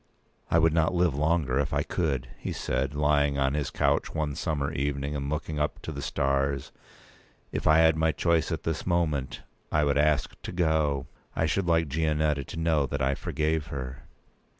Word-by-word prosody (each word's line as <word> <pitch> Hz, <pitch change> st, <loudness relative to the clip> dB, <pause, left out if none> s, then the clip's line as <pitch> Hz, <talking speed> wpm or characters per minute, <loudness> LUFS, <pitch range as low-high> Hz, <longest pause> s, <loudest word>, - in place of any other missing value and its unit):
"I -, -, +3 dB
would 80 Hz, -1 st, +4 dB
not 80 Hz, +2 st, +2 dB
live 85 Hz, -3 st, +3 dB
longer, 75 Hz, -2 st, +1 dB
if 70 Hz, 0 st, -1 dB
I 70 Hz, 0 st, +1 dB
could," 70 Hz, -9 st, -1 dB
he -, -, -4 dB
said, 65 Hz, +2 st, -2 dB
lying 75 Hz, -1 st, +2 dB
on 70 Hz, 0 st, +1 dB
his 75 Hz, -1 st, -1 dB
couch -, -, 0 dB
one 75 Hz, -2 st, -1 dB
summer 75 Hz, -1 st, -2 dB
evening, 70 Hz, 0 st, -2 dB
and 70 Hz, -1 st, -3 dB
looking 75 Hz, 0 st, -3 dB
up 75 Hz, -, -1 dB
to -, -, -4 dB
the 70 Hz, -2 st, -5 dB
stars. 70 Hz, 0 st, 0 dB, 0.8 s
"If -, -, -2 dB
I 80 Hz, -, +6 dB
had 80 Hz, -1 st, +5 dB
my 80 Hz, 0 st, +2 dB
choice 80 Hz, +2 st, +1 dB
at -, -, -3 dB
this 80 Hz, +1 st, -3 dB
moment, 75 Hz, -8 st, 0 dB, 0.3 s
I 75 Hz, -, +3 dB
would 70 Hz, 0 st, +2 dB
ask 75 Hz, -2 st, +2 dB
to -, -, -6 dB
go. 80 Hz, -5 st, +1 dB, 0.3 s
I 80 Hz, -, +1 dB
should 90 Hz, +3 st, 0 dB
like 80 Hz, -1 st, +3 dB
Gianetta 75 Hz, -1 st, 0 dB
to -, -, -7 dB
know 80 Hz, -4 st, +2 dB
that 70 Hz, +2 st, -2 dB
I 65 Hz, +1 st, +2 dB
forgave 75 Hz, +1 st, -1 dB
her." 65 Hz, -2 st, -6 dB
75 Hz, 190 wpm, -27 LUFS, 70-80 Hz, 0.8 s, I